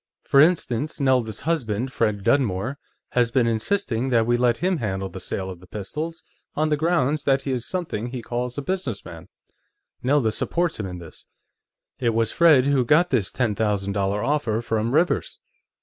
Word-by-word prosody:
For 140 - +5
instance, 155 -4 +1
Nelda's 125 -6 +1
husband, 130 -6 -1
Fred 105 -3 0
Dunmore, 130 +1 +1 0.3
has 120 -2 +2
been 120 0 +2
insisting 120 - 0
that 115 -3 +3
we 120 +1 +2
let 120 -1 +2
him 185 0 0
handle 95 -6 -3
the 95 - -8
sale 95 0 -4
of 90 - -10
the 90 - -16
pistols, 150 - -5 0.3
on 155 +1 +1
the 150 - +3
grounds 155 -2 +1
that 135 -1 +2
he 135 - -2
is 125 -2 -2
something 165 - -3
he 125 -1 -6
calls 125 +2 -3
a 145 - -3
businessman. 120 - -4 0.7
Nelda 130 -3 +2
supports 170 +6 -1
him 100 - -3
in 90 -1 -6
this. 85 -2 -10 0.7
It 115 -3 +1
was 115 -1 +1
Fred 155 -6 +5
who 140 -2 +3
got 165 +8 +3
this 110 -8 +1
ten 120 -4 0
thousand 100 -2 -1
dollar 100 +1 0
offer 125 -5 0
from 110 0 -1
Rivers. 165 +6 +1
125 Hz, 180 wpm, -23 LUFS, 105-145 Hz, 0.7 s, For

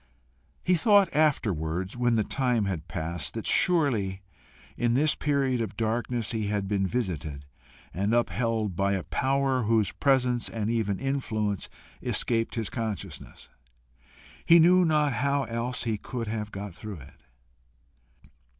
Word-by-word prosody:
He 180 - +2
thought 200 +1 +4
afterwards, 95 - 0
when 120 -1 +2
the 110 - +2
time 125 -3 0
had 85 -5 -3
passed, 80 -1 -3
that 115 - -4
surely 115 - +2 0.5
in 120 0 +1
this 150 +3 +3
period 135 -4 0
of 110 -3 -4
darkness 115 0 -1
he 110 -3 -2
had 100 -1 -1
been 95 -1 0
visited 80 - -3 0.5
and 100 +4 -1
upheld 115 -4 0
by 100 +2 +1
a 95 -2 -2
power 135 -1 0
whose 110 -3 +2
presence 125 -3 +1
and 110 -1 -2
even 105 -4 0
influence 110 -7 -2 0.3
escaped 115 -1 0
his 115 -3 -2
consciousness. 100 - -6 0.9
He 170 - +7
knew 180 +2 +6
not 150 -3 +2
how 140 +4 +1
else 120 +1 -2
he 110 -3 -1
could 120 0 -5
have 105 -1 -4
got 100 -1 -6
through 100 -3 -8
it. 65 - -16
115 Hz, 140 wpm, -27 LUFS, 100-130 Hz, 0.9 s, He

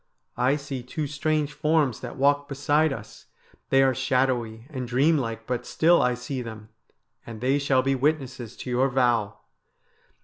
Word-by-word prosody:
I 130 +3 +3
see 140 -3 -5
two 150 +5 -4
strange 150 +1 -1
forms 150 -4 +1
that - - -7
walk 145 +1 +2
beside 145 +3 +2
us. 110 -5 -9 0.4
They 135 0 +5
are 135 -1 +3
shadowy 125 -3 0
and 130 -4 -4
dream 140 +6 +3
like, 115 -3 -4
but 125 0 -2
still 170 +6 +3
I 125 0 +2
see 130 +2 -5
them, 110 -2 -9 0.5
and 115 -2 -9
they 130 +4 +1
shall 135 -2 +2
be 135 +1 +1
witnesses 130 -4 -2
to - - -7
your 130 +2 +2
vow.' 120 -5 +1
130 Hz, 165 wpm, -25 LUFS, 120-145 Hz, 0.5 s, They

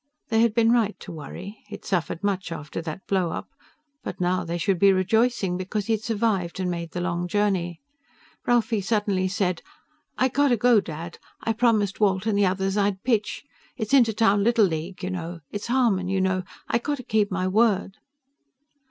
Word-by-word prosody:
They 225 -1 +3
had 230 -2 +2
been 230 -1 +4
right 225 -3 +1
to 185 - -8
worry. 180 +6 -8
He 210 - -7
had 205 - -13
suffered 175 -1 -2
much 195 -4 -1
after 155 0 -5
that 165 +3 -7
blow 185 -3 +1
up. - - -6 0.5
But - - -6
now 180 0 +1
they 170 0 -3
should 180 +1 0
be 200 +1 +6
rejoicing, 195 0 +1
because 190 +2 -3
he 225 - +1
had 215 - -1
survived 210 -6 -1
and 180 -1 -1
made 170 -1 -4
the 175 - -2
long 175 0 -1
journey. 185 -4 0 0.7
Ralphie 230 -3 +2
suddenly 200 -2 0
said, 185 -3 -1 0.6
"I 260 - +3
got 285 +3 +2
to 245 -3 +3
go, 240 0 +5
Dad. 165 0 -7 0.2
I 225 - +1
promised 220 -4 +2
Walt 195 -1 +2
and 220 -2 +1
the 200 -1 +4
others 195 +2 -1
I'd 200 -2 0
pitch. 225 -4 0 0.3
It's 220 0 -3
Inter 240 -5 +5
Town 205 -2 +3
Little 230 -1 +4
League, 170 +2 -4
you 185 - -2
know. 170 -1 -5
It's 205 +1 -5
Harmon, 235 -7 +2
you 190 0 0
know. 185 -1 0 0.2
I 235 - +1
got 290 +4 -2
to 255 - -8
keep 215 -2 +1
my 185 -1 -1
word." 200 -1 +2
200 Hz, 195 wpm, -25 LUFS, 185-225 Hz, 0.7 s, be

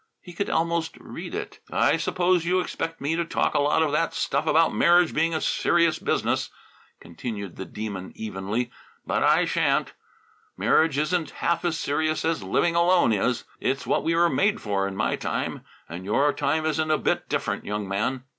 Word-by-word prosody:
He 175 - -12
could 200 +4 -2
almost 165 0 0
read - - -8
it. - - -6
"I - - +3
suppose 180 -1 +1
you 180 +2 +2
expect 165 -2 -4
me 145 +4 0
to 170 - 0
talk 165 - 0
a - - +2
lot 150 +2 +3
of 155 - 0
that 165 +3 0
stuff 140 +4 -1
about 165 +1 +4
marriage 175 -1 +4
being 165 +1 +1
a - - 0
serious 170 -1 +2
business," - - 0 0.5
continued 100 +2 -7
the 95 - -6
Demon 100 -3 -6
evenly. 110 +3 -3 0.3
"But - - 0
I - - +4
shan't. - - +1 0.6
Marriage 160 -3 +3
isn't 155 +1 0
half 170 +1 -1
as 170 -2 0
serious 155 +2 -1
as 165 -5 0
living 100 - +1
alone 170 -7 +4
is. 115 +4 0 0.2
It's 135 +1 -1
what - - +1
we 165 - +1
were 170 +1 +4
made 205 +5 +1
for 100 -2 -1
in 100 - -6
my - - 0
time, - - -3 0.2
and 85 +3 -7
your 140 +9 +2
time 155 +2 0
isn't 155 0 0
a 155 - +3
bit - - -1
different, - - -2
young 105 -1 -3
man." 110 +7 -1
155 Hz, 185 wpm, -25 LUFS, 110-170 Hz, 0.6 s, about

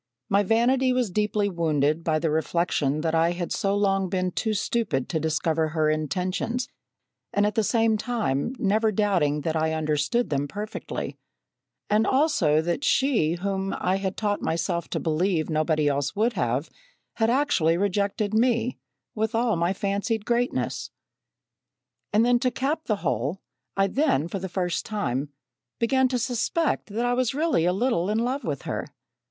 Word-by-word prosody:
My 200 0 +4
vanity 250 +5 +2
was 250 -6 0
deeply 210 +1 +1
wounded 160 -3 0
by 160 -1 +1
the 155 0 0
reflection 155 -2 0
that 160 0 -1
I 165 +1 +3
had 175 -1 -4
so 200 0 0
long 195 -2 +1
been 185 0 -1
too 220 +3 -1
stupid 200 - -1
to 160 - 0
discover 160 +1 0
her 155 -1 +1
intentions, 180 - -2 0.6
and 205 0 +2
at 210 - 0
the 225 - +2
same 225 0 +2
time 225 - -1
never 215 +2 +2
doubting 185 -8 +1
that 160 +2 -2
I 160 0 +1
understood 155 +9 0
them 140 0 0
perfectly; 210 +7 -5 0.7
and 215 +2 +2
also, 175 - +3
that 175 - -2
she, 250 - +2
whom 195 +2 -2
I 185 +1 +1
had 190 -1 -3
taught 205 -1 -1
myself 170 +1 -1
to - - -2
believe 165 0 0
nobody 155 -1 +1
else 140 -1 0
would 225 +4 +1
have, 125 +5 -1 0.5
had 225 0 +2
actually 235 - +2
rejected 200 +2 0
me, 235 +1 +1 0.3
with 220 +1 -1
all 230 -1 +2
my 170 +2 +1
fancied 200 +2 -1
greatness. 240 +1 -1 1.2
"And 215 +2 +4
then 245 0 +4
to 255 - +2
cap 290 +6 -2
the 215 - +1
whole, 135 - -1 0.3
I 195 - +4
then, 195 - +1
for 195 +3 -4
the 190 0 -5
first 180 -2 -1
time, 145 - -2 0.5
began 260 +3 +3
to 255 0 -1
suspect 250 +7 0
that 225 +3 -2
I 245 - +2
was 255 0 0
really 305 - +2
a 180 - +3
little 195 -3 0
in 215 - +1
love 250 +5 -1
with 145 -5 -3
her. - - -3
195 Hz, 165 wpm, -25 LUFS, 160-230 Hz, 1.2 s, My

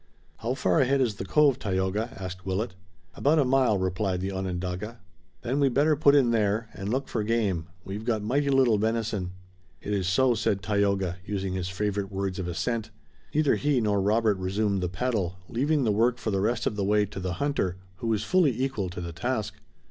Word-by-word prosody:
"How 120 +3 -2
far 160 - +2
ahead 135 0 +3
is 115 -6 +1
the - - -4
cove, 140 +4 +3
Tayoga?" 95 +2 -1
asked 90 -1 -6
Willet. 95 +2 -2 0.4
"About 145 - +2
a 145 - +4
mile," 130 -5 +3
replied 95 0 -1
the 95 +1 -3
Onondaga. 95 +4 -4 0.4
"Then 130 +4 0
we'd 135 -3 +2
better 150 +3 +4
put 140 0 +5
in 130 -5 +4
there, 110 0 +1
and 95 +1 -5
look 130 +4 -1
for 115 - -2
game. 105 -7 0 0.2
We've 100 +3 -5
got 110 -3 0
mighty 140 +6 +1
little 130 -6 +4
venison." 110 -4 -1 0.5
"It 105 - -4
is 95 -3 0
so," 125 +7 +3
said 105 -3 0
Tayoga, 100 -3 +1
using 95 -2 -3
his 95 -1 -2
favorite 100 +1 -2
words 95 -1 -3
of 90 - -3
assent. 105 +6 -2 0.5
Neither 150 -2 +3
he 145 -3 +2
nor 105 -3 +1
Robert 105 0 +2
resumed 100 +1 0
the 90 - -1
paddle, 95 -3 -1
leaving 140 +4 +1
the 110 - +2
work 115 +4 +2
for 115 -2 -3
the 95 -1 0
rest 115 +3 0
of - - 0
the 100 - -1
way 105 +1 +3
to 100 -1 -8
the 90 -1 -2
hunter, 95 -7 -1 0.2
who 115 - -4
was 110 -2 +1
fully 150 -4 +2
equal 130 -8 -1
to 90 0 -6
the 85 -1 -5
task. 110 +5 -2
105 Hz, 200 wpm, -27 LUFS, 95-125 Hz, 0.5 s, put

